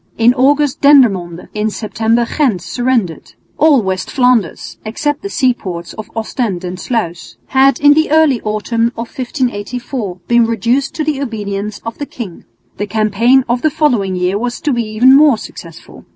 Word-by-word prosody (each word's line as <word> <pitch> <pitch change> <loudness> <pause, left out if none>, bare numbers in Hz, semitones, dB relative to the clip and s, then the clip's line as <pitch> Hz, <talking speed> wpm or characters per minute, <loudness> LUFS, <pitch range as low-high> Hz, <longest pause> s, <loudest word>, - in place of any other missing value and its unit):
In 230 +2 +4
August 280 +2 +2
Dendermonde, 195 - +3
in 215 +1 -1
September 225 +2 0
Ghent, 230 - 0
surrendered. 215 - -2 0.3
All 290 -6 +4
West 190 -1 -3
Flanders, 250 -8 0
except 290 +7 -2
the 400 - -5
sea 260 -9 +2
ports 175 -7 -7
of 215 - -9
Ostend 220 -4 -3
and 180 0 -5
Sluis, 180 -9 -4
had 265 -1 +3
in 290 0 +6
the 315 +1 +1
early 305 -5 +3
autumn 220 +2 -1
of 230 0 -7
1584 245 -4 -3
been 235 -1 +3
reduced 235 +5 0
to 310 - -1
the 295 -2 -2
obedience 210 -4 -4
of 230 - -6
the 290 - -4
king. 205 -9 -8 0.3
The 205 - -3
campaign 220 +5 +2
of 240 +1 0
the 310 - +2
following 240 -11 0
year 180 +2 0
was 240 +1 -3
to 295 - 0
be 240 - 0
even 230 +5 +4
more 290 -4 +5
successful. 165 -5 -12
235 Hz, 165 wpm, -15 LUFS, 205-265 Hz, 0.3 s, in